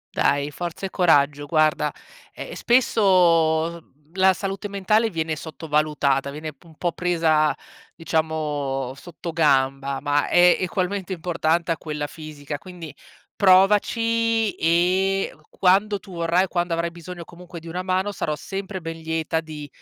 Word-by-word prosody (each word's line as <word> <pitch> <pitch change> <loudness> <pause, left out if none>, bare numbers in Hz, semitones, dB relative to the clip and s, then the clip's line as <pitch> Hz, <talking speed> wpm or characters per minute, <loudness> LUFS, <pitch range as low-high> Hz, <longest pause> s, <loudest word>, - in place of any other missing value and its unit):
Dai, 145 +1 +1
forza 175 +4 -5
e 190 - -5
coraggio. 145 -5 +2
Guarda, 155 -1 +2 0.4
ehm, - - -7
spesso, 170 -8 +3
mhmm, 150 +3 -32
la 190 0 +5
salute 195 +1 -4
mentale 215 +3 +1
viene 160 -3 -2
sottovalutata. 150 -3 -1
Viene 155 +2 -6
un 160 -2 -17
po' 175 +2 -1
presa, 165 -3 +2 0.4
diciamo, 150 -5 -2
sottogamba, 140 -5 0
ma 145 +1 +1
è 175 0 +5
egualmente 185 +1 -2
importante 170 -1 0
a 165 - 0
quella 150 -2 -4
fisica, 145 -1 -8
quindi 175 -4 -10 0.4
provaci 225 +3 +3
e 185 +4 +1
q 155 - -25
quando 200 +3 +2
tu 190 0 -13
vorrai, 170 +2 +1
quando 175 -1 -1
avrai 170 0 -2
bisogno 170 0 -9
comunque 175 0 -11
di 165 - -13
una 180 +2 -4
mano, 185 +2 -1
sarò 155 -5 -2
sempre 195 +3 -6
ben 165 0 -6
lieta 160 0 -1
di 155 -2 -8
165 Hz, 135 wpm, -23 LUFS, 155-185 Hz, 0.4 s, la